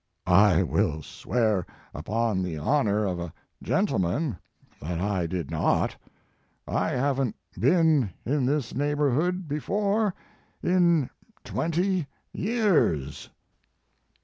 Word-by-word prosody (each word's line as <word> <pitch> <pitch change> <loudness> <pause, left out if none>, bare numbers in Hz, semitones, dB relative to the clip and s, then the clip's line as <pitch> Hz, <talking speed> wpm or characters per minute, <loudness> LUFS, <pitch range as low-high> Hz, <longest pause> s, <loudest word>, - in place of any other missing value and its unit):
1< 90 -1 +3
I 100 -3 +6
will 75 0 0
swear 110 -2 0 0.3
upon 110 -2 -1
the 90 -4 -3
honor 105 - +1
of 90 -3 -2
a 85 -2 -5 0.3
gentleman 100 - 0 0.5
that 85 +3 -3
I 95 -3 0
did 85 -4 -4
not. - - +1 0.7
I - - 0
haven 135 -2 0 0.2
t - - -10
been 155 - +4 0.2
in 135 0 +1
this 140 -3 -1
neighborhood 145 +5 0
before 200 +7 0 0.5
in 170 -6 +3 0.4
twenty 175 0 0 0.3
years." 185 - +1
130 Hz, 105 wpm, -26 LUFS, -, 0.7 s, I